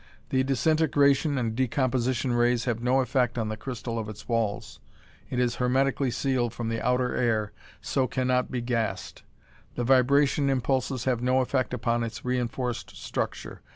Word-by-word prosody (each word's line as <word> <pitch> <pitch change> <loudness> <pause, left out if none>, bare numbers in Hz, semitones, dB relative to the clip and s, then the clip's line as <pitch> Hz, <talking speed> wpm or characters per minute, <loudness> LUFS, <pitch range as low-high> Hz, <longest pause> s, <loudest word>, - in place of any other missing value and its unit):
The 130 - +2
disintegration 145 0 +2
and 115 -3 -1
decomposition 130 0 0
rays 120 0 +2
have 115 -2 -1
no 125 +2 +3
effect 125 -2 0
on 110 -2 -1
the 110 - -3
crystal 115 0 -5
of 110 -1 -5
its 105 - -10
walls. 115 -4 -2 0.5
It 125 - -3
is 120 -2 +1
hermetically 135 +2 +1
sealed 120 -2 -1
from 115 -1 -3
the 115 0 -2
outer 125 0 +1
air 110 -4 0 0.3
so 130 -1 0
can 130 0 -2
not 125 0 +1
be 125 - -3
gassed. 115 -6 -2 0.5
The 120 - -1
vibration 140 +3 +3
impulses 130 -1 0
have 125 -3 +1
no 130 +1 +2
effect 130 0 0
upon 120 -1 0
its 115 -1 -5
reinforced 125 -1 -2
structure. - - -4
125 Hz, 160 wpm, -27 LUFS, 115-130 Hz, 0.5 s, no